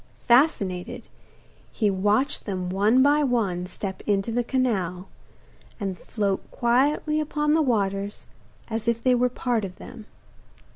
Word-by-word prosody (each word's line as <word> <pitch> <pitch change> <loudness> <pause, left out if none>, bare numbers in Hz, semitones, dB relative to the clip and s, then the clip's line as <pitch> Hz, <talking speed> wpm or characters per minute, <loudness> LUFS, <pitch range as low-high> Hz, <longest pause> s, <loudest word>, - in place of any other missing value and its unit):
Fascinated, 220 - +2 0.6
he 210 -4 +1
watched 210 +9 0
them 185 -2 -3
one 215 +7 +4
by 290 +2 +4
one 200 -9 0
step 190 0 -5
into 205 +2 +1
the 240 +1 0
canal, 195 -9 -1 0.7
and 195 -3 -3
float 200 -3 -2
quietly 285 +5 +1
upon 300 0 0
the 320 - +4
waters 200 -6 -1 0.4
as 225 0 -4
if 235 -1 +1
they 255 +2 +2
were 250 0 +2
part 240 -2 -1
of 185 -2 -6
them. 215 +3 -11
225 Hz, 135 wpm, -25 LUFS, 195-255 Hz, 0.7 s, one